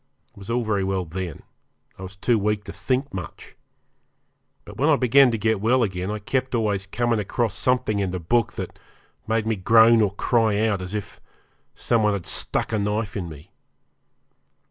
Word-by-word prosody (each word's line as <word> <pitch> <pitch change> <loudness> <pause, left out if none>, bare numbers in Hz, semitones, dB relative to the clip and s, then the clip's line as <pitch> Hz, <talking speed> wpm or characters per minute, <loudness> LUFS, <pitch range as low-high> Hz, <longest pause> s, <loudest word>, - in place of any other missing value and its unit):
It - - -27
was 100 - -11
all 120 +1 0
very 105 -3 0
well 95 -1 -1
then; 85 -1 -6 0.6
I - - -9
was 95 +1 -8
too 115 +4 +1
weak 105 0 -1
to - - -8
think 130 +2 -2
much. 95 -2 -8 1.1
But - - -11
when 145 +4 +2
I 155 - +6
began 135 +1 +5
to 115 - -1
get 110 -1 0
well 120 +3 +3
again 95 -2 -3
I 105 - -2
kept 130 +5 -2
always 105 -4 -1
coming 120 +2 0
across 110 +1 -1
something 125 -1 0
in 100 -2 0
the 90 - -3
book 115 +7 +1
that - - -7 0.5
made 110 0 0
me 110 0 0
groan 110 +4 +5
or 100 -2 0
cry 110 -2 +1
out, 100 -4 -1
as 90 +3 -6
if 105 - -6 0.5
some 120 -2 +1
one 105 -1 +2
had 100 -4 -4
stuck - - -2
a 110 - +1
knife 105 0 -2
in 90 -5 -4
me. 75 -2 -12
105 Hz, 190 wpm, -23 LUFS, 95-115 Hz, 1.1 s, I